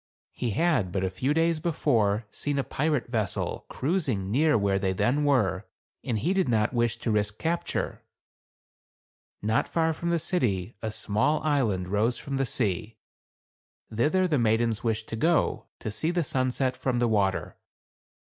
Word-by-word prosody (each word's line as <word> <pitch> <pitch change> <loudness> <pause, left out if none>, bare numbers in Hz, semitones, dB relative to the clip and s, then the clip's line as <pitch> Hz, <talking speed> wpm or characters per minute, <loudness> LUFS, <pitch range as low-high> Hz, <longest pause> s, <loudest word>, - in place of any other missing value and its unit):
He 120 - -3
had, 115 - +1
but 95 0 -1
a 95 - -1
few 125 +9 -1
days 165 +1 +2
before, 115 -10 +1
seen 145 -1 -2
a 140 - +1
pirate 150 -4 -1
vessel 110 -6 -2
cruising 130 - -1
near 150 +4 +3
where 100 -2 +1
they 95 -1 0
then 135 +10 +1
were, 105 -8 +1 0.4
and 115 - -1
he 165 - 0
did 190 -7 +1
not 110 0 +2
wish 120 -1 +1
to 115 - -2
risk 105 0 0
capture. 170 +1 -2 1.4
Not 110 +2 +1
far 160 -1 +1
from 170 +2 -3
the 170 - +2
city 120 - -1
a 110 - -2
small 110 +8 0
island 115 -12 +1
rose 110 +5 +1
from 140 -1 -4
the 135 -1 0
sea. 110 -1 -1 1.0
Thither 155 +12 +2
the 150 -6 +1
maidens 115 -1 +1
wished 110 -1 -1
to - - -3
go, 165 +9 +1
to 110 - -5
see 155 +9 -1
the 175 -1 +1
sunset 130 -1 0
from 130 -2 -1
the 120 0 +2
water. 100 -4 0
120 Hz, 165 wpm, -27 LUFS, 105-150 Hz, 1.4 s, near